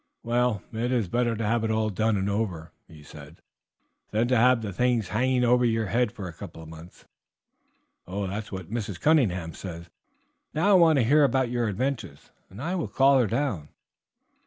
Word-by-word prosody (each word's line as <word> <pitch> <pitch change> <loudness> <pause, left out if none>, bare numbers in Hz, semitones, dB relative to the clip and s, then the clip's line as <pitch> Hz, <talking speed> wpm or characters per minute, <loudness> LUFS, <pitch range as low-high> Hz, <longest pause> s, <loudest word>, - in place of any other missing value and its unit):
"Well, 120 -3 0
it 120 +3 -2
is 120 -6 0
better 120 +4 0
to 110 0 -3
have 115 +2 +1
it 110 - -1
all 110 -1 0
done 110 +2 0
and 95 0 -1
over," 95 -6 -3 0.2
he 75 -2 -15
said, 75 +2 -13 0.7
"than 110 +3 0
to 130 - +3
have 120 0 +4
the 100 -2 -4
thing 125 +3 +1
hanging 125 +6 0
over 125 +1 +3
you 115 -2 +1 0.2
for 100 -2 -8
a 85 - -8
couple 85 -2 -10
of 80 - -12
months." 80 +2 -13 1.0
"That 100 +3 -4
is - - -16
what 95 -1 -7
Mrs. 105 -7 -4
Cunningham 95 - +2
says. 85 -1 -9 0.6
Now 180 +7 +2
I - - +6
want 165 -5 +5
to 125 - +3
hear 145 +5 +4
about 130 -2 +1
your 120 -2 0
adventures, 115 - -4 0.2
and 100 - -12
I 165 +7 -3
will 175 -4 -2
call 135 0 +4
her 120 - +2
down." 100 - -2
110 Hz, 190 wpm, -26 LUFS, 95-125 Hz, 1.0 s, I